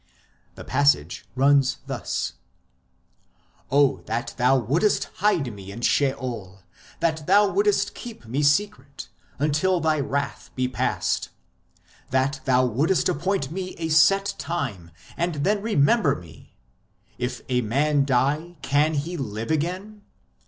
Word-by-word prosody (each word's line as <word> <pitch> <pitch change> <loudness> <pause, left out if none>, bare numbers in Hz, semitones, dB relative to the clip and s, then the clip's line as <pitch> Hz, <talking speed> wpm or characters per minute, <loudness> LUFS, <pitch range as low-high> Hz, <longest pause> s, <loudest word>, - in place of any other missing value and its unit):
The - - -9
passage 140 - +1
runs 135 0 +3
thus: - - -3 0.7
" - - -38
Oh 140 0 +3
that 115 +2 -3
Thou 125 +2 +3
wouldest 150 - +1
hide 180 - +1
me 100 -1 -10
in 115 +4 -8
Sheol, 120 -9 -1 0.4
that 160 -2 0
Thou 200 +2 +5
wouldest 415 0 +1
keep 235 - -10
me 125 +6 -2
secret, 145 -1 0 0.3
Until 155 +6 +1
Thy 155 -1 +1
wrath 140 0 -3
be 130 0 0
past; 125 - -1 0.8
that 130 +2 0
Thou 130 -1 +3
wouldest 145 - +1
appoint 170 -3 -1
me 185 +1 -5
a 160 -1 -3
set 195 +6 +4
time 120 - -4 0.3
and 170 -1 -1
then 205 +3 +1
remember 205 - +3
me! 80 -3 -14 0.6
If 125 +1 -3
a 125 -1 +1
man 140 +6 +1
die, 145 +6 0
can 150 +3 +2
he 165 +5 -3
live 110 -1 -4
again 185 +7 -2
145 Hz, 130 wpm, -24 LUFS, 130-175 Hz, 0.8 s, Thou